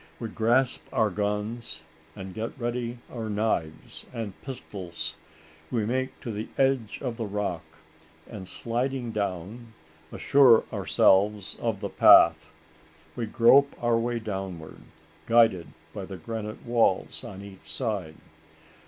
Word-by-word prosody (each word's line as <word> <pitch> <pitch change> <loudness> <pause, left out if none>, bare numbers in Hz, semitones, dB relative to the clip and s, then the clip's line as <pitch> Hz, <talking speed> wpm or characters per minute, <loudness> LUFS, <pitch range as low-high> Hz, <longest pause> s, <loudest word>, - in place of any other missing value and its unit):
We 115 - -4
grasp 120 +4 +2
our 110 -2 +2
guns, 105 -3 -3 0.3
and 95 -1 -8
get 110 +3 -5
ready 120 0 -3 0.2
our 115 -3 -4
knives 105 -7 -2
and 115 -5 -5
pistols. 90 - -5 0.5
We 115 -4 0
make 130 +3 -2
to 115 - -5
the 105 +1 -5
edge 135 -5 +1
of 120 -3 -3
the 115 -3 -3
rock, 100 -4 -2 0.7
and, 95 -3 -9
sliding 120 +2 -2
down, 105 +3 -4 0.4
assure 130 -5 +5
ourselves 100 +1 +3
of - - -1
the - - -3
path. 80 -2 +6 0.7
We 115 - -3
grope 130 +5 +5
our 120 -1 +2
way 120 +1 -1
downward, 95 -7 -6 0.5
guided 115 -7 +4 0.3
by - - -5
the 95 - -8
granite 110 +5 -6
walls 120 -1 +1
on 100 0 -8
each 100 -2 -12
side. 100 -10 -3
110 Hz, 125 wpm, -27 LUFS, 95-120 Hz, 0.7 s, path